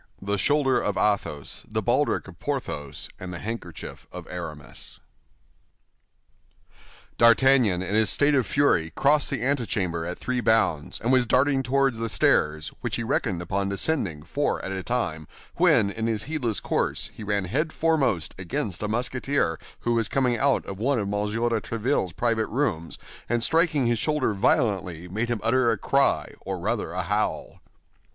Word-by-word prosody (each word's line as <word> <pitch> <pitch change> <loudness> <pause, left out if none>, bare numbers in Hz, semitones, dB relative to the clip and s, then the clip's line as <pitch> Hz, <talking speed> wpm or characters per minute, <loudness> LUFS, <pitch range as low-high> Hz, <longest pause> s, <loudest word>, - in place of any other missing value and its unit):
THE 100 +1 -2
SHOULDER 135 0 +2
OF 105 - -1
ATHOS, 100 -9 0
THE - - -2
BALDRIC - - +1
OF - - -13
PORTHOS 70 -2 -4
AND 90 -1 -6
THE 90 - -5
HANDKERCHIEF 105 -4 -7
OF - - -9
ARAMIS - - -8 2.2
D'Artagnan, 115 -5 +5
in 100 - -2
a 110 -1 +4
state 145 +8 +3
of 130 -4 +2
fury, 110 - +2
crossed 145 +1 +3
the - - -2
antechamber 105 -11 0
at 90 +2 -5
three 125 -1 -2
bounds, 110 -11 +1
and 120 - 0
was 130 -2 +3
darting 135 +3 +3
toward 135 -1 +1
the 115 0 -2
stairs, 75 -6 +2
which - - -2
he - - -3
reckoned 90 -2 -1
upon 100 +3 -1
descending 100 - 0
four 145 - -1
at 95 - -4
a 95 -1 -3
time, 85 -10 -2 0.3
when, 100 - +4
in 110 +2 -3
his 110 -2 -1
heedless 130 -8 -1
course, - - -1
he 110 - -9
ran 100 -2 -1
head 155 - -1
foremost 140 - +1
against 90 +1 -3
a 105 - -1
Musketeer 125 - 0 0.2
who 120 - 0
was 115 -2 +1
coming 125 -3 +1
out 135 +2 +2
of 95 0 -7
one 135 +4 +1
of 105 - -1
M. 105 0 -1
de 115 +1 0
Tréville's 115 -5 -1
private 115 0 0
rooms, 110 - -2 0.3
and 120 0 +1
striking 160 -2 +2
his 120 -1 +1
shoulder 150 -6 0
violently, 100 - 0
made 110 +6 -2
him 120 -2 -1
utter 120 +1 +3
a 115 - +1
cry, 140 +7 +1
or - - -5
rather - - -2
a - - -2
howl. - - -2
115 Hz, 165 wpm, -25 LUFS, 95-130 Hz, 2.2 s, D'Artagnan